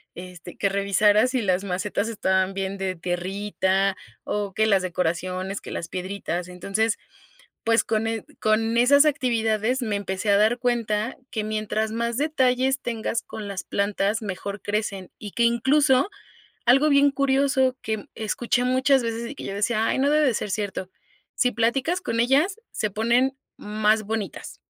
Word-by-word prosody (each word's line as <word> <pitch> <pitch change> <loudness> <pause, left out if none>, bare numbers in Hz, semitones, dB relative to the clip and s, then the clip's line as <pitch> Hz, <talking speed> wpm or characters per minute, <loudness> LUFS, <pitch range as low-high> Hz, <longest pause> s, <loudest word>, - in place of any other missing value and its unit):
este, 180 -1 -10
que 200 - 0
revisara 200 +3 +3
si 255 -1 -1
las 190 -1 0
macetas 200 +3 -2
estaban 190 -3 0
bien 195 0 -3
de 190 -1 -2
tierrita 190 +2 -1 0.3
o 205 -2 -3
que 220 +2 +2
las 195 -3 +3
decoraciones, 185 +2 -2
que - - -10
las 165 - -5
piedritas, 185 -1 -4
entonces, 195 +5 -1 0.7
pues, 230 0 +3
con 220 0 0
e 225 -1 -3 0.2
con 225 +1 +2
esas 280 +5 +6
actividades 240 -4 +1
me 215 -4 -1
empecé 200 0 -3
a 200 - +5
dar 220 +4 +3
cuenta 230 -2 0 0.2
que 215 -2 -2
mientras 215 0 -2
más 235 +1 -1
detalles 265 -3 +1
tengas 230 0 -2
con 210 -2 -8
las 195 -2 -5
plantas, 200 +2 0
mejor 200 0 -5
crecen 205 -3 -3
y 205 - -7
que 235 - 0
incluso, 265 - +3 0.6
algo 270 +5 +5
bien 280 0 +5
curioso 270 -1 +2
que 220 -2 -4
escuché 235 +3 -1
muchas 260 +2 +3
veces 230 0 -3
y 285 - -8
que - - -8
yo 195 - -4
decía: 215 +2 +1
"Ay, - - 0
no 275 +2 +3
debe 300 0 +4
de 250 - +2
ser 210 - -3
cierto", 190 -2 -3 0.5
si 250 0 +2
platicas 265 - 0
con 230 -9 -2
ellas, 290 - +2
se 215 - -1
ponen 240 +6 +1 0.2
más 215 +1 +1
bonitas. 210 -5 -5
220 Hz, 165 wpm, -24 LUFS, 195-250 Hz, 0.7 s, esas